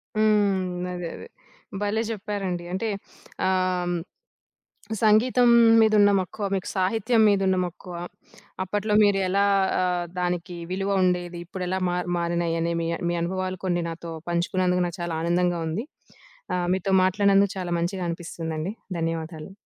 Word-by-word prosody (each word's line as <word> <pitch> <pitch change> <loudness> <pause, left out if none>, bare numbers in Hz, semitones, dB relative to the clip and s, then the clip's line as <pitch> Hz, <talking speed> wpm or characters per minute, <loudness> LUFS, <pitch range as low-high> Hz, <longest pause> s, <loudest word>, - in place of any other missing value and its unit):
హ్మ్. 200 -4 +2
అదే, 175 -1 -4
అదే. - - -10 0.5
భలే 205 +2 0
చెప్పారండి. 195 -4 -3
అంటే, 220 +4 -1 0.6
ఆహ్, 185 -1 +1
హ్మ్. 175 - 0 1.1
సంగీతం 240 +3 +5 0.3
మీదున్న 215 -2 +5
మక్కువ, 190 +3 -4
మీకు 190 - -3
సాహిత్యం 225 +5 +2
మీదున్న 190 -2 +2
మక్కువ, 180 +1 -9 0.7
అప్పట్లో 205 +3 -1
మీరెలా 195 -1 +2 0.4
ఆహ్, 180 -1 0
దానికి 180 0 -2
విలువ 195 +1 -1
ఉండేది. 180 -1 0
ఇప్పుడెలా 185 +1 -3
మా 175 - -1 0.2
మారినాయి 170 -1 0
అని 170 +1 0
మీ 165 - -2
అన్ - - -9
మీ 175 - 0
అనుభవాలు 185 +1 -2
కొన్ని 175 -2 0
నాతో 165 0 -7 0.2
పంచుకున్నందుకు 180 +1 +1
నాకు 175 - -7
చాలా 170 -1 -2
ఆనందంగా 175 0 +1
ఉంది. 200 +10 -3 0.7
ఆహ్, 175 -1 -1
మీతో 190 +1 -1
మాట్లాడినందుకు 195 +1 +3
చాలా 175 -1 -3
మంచిగా 180 +1 -2
అనిపిస్తుందండి. 165 +1 -4 0.3
ధన్యవాదాలు. 165 0 -4
185 Hz, 130 wpm, -25 LUFS, 175-200 Hz, 1.1 s, సంగీతం